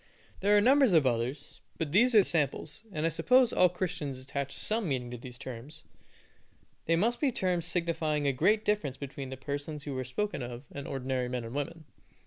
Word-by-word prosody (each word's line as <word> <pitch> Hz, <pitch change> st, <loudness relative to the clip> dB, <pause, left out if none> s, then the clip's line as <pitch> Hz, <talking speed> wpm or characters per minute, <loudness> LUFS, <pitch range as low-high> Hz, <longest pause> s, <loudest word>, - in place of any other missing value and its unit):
There 205 Hz, +2 st, +4 dB
are -, -, +5 dB
numbers 265 Hz, -1 st, +5 dB
of 160 Hz, -4 st, +5 dB
others, 125 Hz, +4 st, -2 dB, 0.2 s
but 160 Hz, -3 st, -3 dB
these 235 Hz, +7 st, +4 dB
are 210 Hz, -, +8 dB
samples, 155 Hz, +1 st, -1 dB
and 155 Hz, -3 st, -2 dB
I -, -, +3 dB
suppose 250 Hz, +9 st, +4 dB
all 180 Hz, -, +5 dB
Christians 175 Hz, -6 st, -3 dB
attach 140 Hz, +1 st, -4 dB
some 215 Hz, +1 st, -1 dB
meaning 125 Hz, -3 st, -2 dB
to 125 Hz, -, -5 dB
these 125 Hz, 0 st, -10 dB
terms. 130 Hz, +5 st, -9 dB, 1.0 s
They 165 Hz, -, +3 dB
must 230 Hz, +8 st, +1 dB
be 285 Hz, -3 st, +2 dB
terms 180 Hz, -6 st, -1 dB
signifying 160 Hz, -4 st, 0 dB
a 140 Hz, -, +2 dB
great 205 Hz, +11 st, +2 dB
difference 205 Hz, -11 st, 0 dB
between 140 Hz, -1 st, -6 dB
the 130 Hz, -, -6 dB
persons 145 Hz, +2 st, -5 dB
who 145 Hz, -3 st, -5 dB
are -, -, -1 dB
spoken 205 Hz, +9 st, -3 dB
of 120 Hz, +1 st, -6 dB
and 140 Hz, -1 st, -7 dB
ordinary 130 Hz, -2 st, -2 dB
men 125 Hz, -1 st, -3 dB
and 115 Hz, +1 st, -7 dB
women. 155 Hz, +3 st, -4 dB
150 Hz, 195 wpm, -30 LUFS, 130-185 Hz, 1.0 s, are